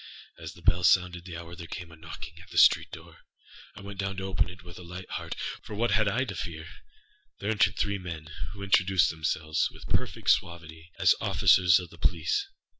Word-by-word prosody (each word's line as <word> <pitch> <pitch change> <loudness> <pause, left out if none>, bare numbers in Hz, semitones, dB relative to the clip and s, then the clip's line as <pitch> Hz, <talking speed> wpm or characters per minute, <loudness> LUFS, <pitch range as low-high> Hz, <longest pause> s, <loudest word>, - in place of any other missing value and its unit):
As 80 -1 -7
the 85 - -17
bell 90 +1 +3
sounded 90 0 +3
the 85 -3 -7
hour, 85 0 -9
there 85 -1 -9
came 85 0 -7
a - - -12
knocking 80 +1 -10
at 90 - -15
the - - -7
street - - +6
door. - - -12 0.6
I 105 - -10
went 100 0 -9
down 100 -1 -2
to 95 - -4
open 95 -2 0
it 90 -1 -12
with 90 0 -11
a - - -10
light 90 +2 -8
heart, - - -4 0.3
âfor 105 -3 -8
what 120 0 +1
had 105 +1 +3
I 100 - 0
now - - +1
to 100 -6 -6
fear? 80 -3 -5 0.7
There 100 +2 -2
entered 100 -2 +3
three 100 -1 0
men, 80 -4 -7 0.2
who 100 -1 -8
introduced 95 -1 +3
themselves, 80 0 -1
with - - -13
perfect - - +1
suavity, 85 -1 -2
as - - +5
officers 90 -1 +5
of 90 -2 -9
the 85 - -15
police. 90 - 0
90 Hz, 215 wpm, -28 LUFS, 85-95 Hz, 0.7 s, street